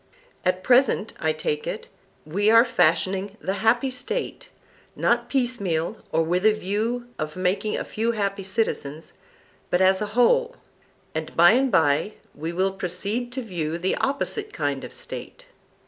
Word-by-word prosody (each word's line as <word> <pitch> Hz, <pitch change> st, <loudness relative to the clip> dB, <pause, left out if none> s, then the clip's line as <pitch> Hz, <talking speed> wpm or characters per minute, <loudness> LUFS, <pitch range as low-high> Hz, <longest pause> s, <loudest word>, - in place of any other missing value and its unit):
At 185 Hz, 0 st, 0 dB
present, 245 Hz, -4 st, +3 dB
I 160 Hz, -, +1 dB
take 155 Hz, -1 st, -2 dB
it, -, -, -4 dB, 0.4 s
we 200 Hz, +7 st, +1 dB
are 230 Hz, +2 st, +7 dB
fashioning 195 Hz, 0 st, +1 dB
the 190 Hz, -, -2 dB
happy 240 Hz, +4 st, +3 dB
State, -, -, -4 dB, 0.5 s
not 240 Hz, 0 st, +1 dB
piecemeal, 205 Hz, -, 0 dB
or 165 Hz, -, +2 dB
with 175 Hz, +3 st, 0 dB
a 215 Hz, 0 st, +6 dB
view 220 Hz, +4 st, -2 dB
of 155 Hz, -1 st, -4 dB
making 185 Hz, +3 st, 0 dB
a -, -, -2 dB
few 230 Hz, +2 st, -1 dB
happy 200 Hz, -2 st, -2 dB
citizens, 185 Hz, -7 st, -2 dB, 0.6 s
but 180 Hz, -, +2 dB
as 190 Hz, +1 st, +4 dB
a 210 Hz, -, -1 dB
whole; 485 Hz, -, +4 dB, 0.6 s
and 160 Hz, 0 st, -5 dB
by 175 Hz, +2 st, +8 dB
and 260 Hz, +3 st, +2 dB
by 160 Hz, +4 st, +2 dB, 0.2 s
we 160 Hz, +3 st, -5 dB
will 190 Hz, +3 st, +1 dB
proceed 195 Hz, +6 st, -3 dB
to 260 Hz, 0 st, -4 dB
view 165 Hz, -6 st, -3 dB
the 180 Hz, +2 st, 0 dB
opposite 410 Hz, +10 st, -1 dB
kind -, -, -2 dB
of -, -, -7 dB
State. -, -, -9 dB
200 Hz, 155 wpm, -24 LUFS, 175-240 Hz, 0.6 s, by